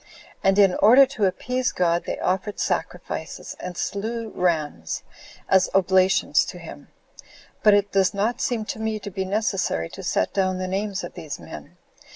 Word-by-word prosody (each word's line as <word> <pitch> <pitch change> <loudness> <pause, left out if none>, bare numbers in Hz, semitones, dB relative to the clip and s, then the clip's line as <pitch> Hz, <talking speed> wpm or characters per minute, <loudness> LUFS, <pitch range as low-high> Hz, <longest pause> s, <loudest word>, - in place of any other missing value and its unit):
And 195 0 +3
in 195 -3 +6
order 250 +6 +8
to 250 -6 -1
appease 250 +7 -1
God, 170 -1 +1
they - - -3
offered 190 +3 -2
sacrifices, - - -4
and 180 -1 -6
slew 225 +3 -3
rams, 155 - -1 0.4
as 190 -1 +4
oblations 190 0 +3
to - - -8
him; - - -11 0.7
but 210 -1 +6
it 205 0 +1
does 190 -1 +3
not 210 +4 -1
seem 230 -3 -1
to 220 - -5
me 220 0 -1
to 205 -1 -8
be 190 +1 -3
necessary 190 - -1
to - - -9
set 95 - 0
down 185 -1 +1
the 185 0 -3
names 195 +1 -2
of - - -7
these 160 -5 -7
men. - - -11
195 Hz, 170 wpm, -24 LUFS, 185-215 Hz, 0.7 s, order